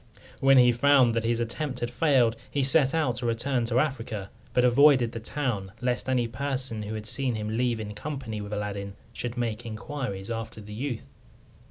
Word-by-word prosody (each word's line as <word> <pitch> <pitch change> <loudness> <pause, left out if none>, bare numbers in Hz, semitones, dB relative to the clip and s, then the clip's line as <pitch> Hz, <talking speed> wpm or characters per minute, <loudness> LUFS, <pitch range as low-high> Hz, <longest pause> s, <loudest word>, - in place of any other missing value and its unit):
When 135 0 +6
he 125 -1 +7
found 130 -1 +4
that 115 0 0
his 115 0 +1
attempt 125 +3 -3
had 120 0 -2
failed, 125 -4 +3
he 140 - 0
set 135 +2 +4
out 140 -8 +1
to 125 -1 -2
return 120 +2 0
to 115 +1 0
Africa, 115 -9 -2 0.2
but 125 - +2
avoided 125 -1 +5
the 115 - -5
town, 110 -6 -2
lest 125 +1 -1
any 125 -2 +2
person 130 -1 -3
who 105 +1 -5
had 110 0 -6
seen 130 +1 -1
him 110 0 -3
leave 120 -1 +1
in 105 -1 -5
company 120 -3 -5
with 105 0 -7
Aladdin 100 -1 -4 0.2
should 120 0 -4
make 115 -1 -2
inquiries 115 -3 -5
after 115 -1 -5
the 105 0 -9
youth. 120 +1 -4
120 Hz, 190 wpm, -27 LUFS, 110-135 Hz, 0.2 s, he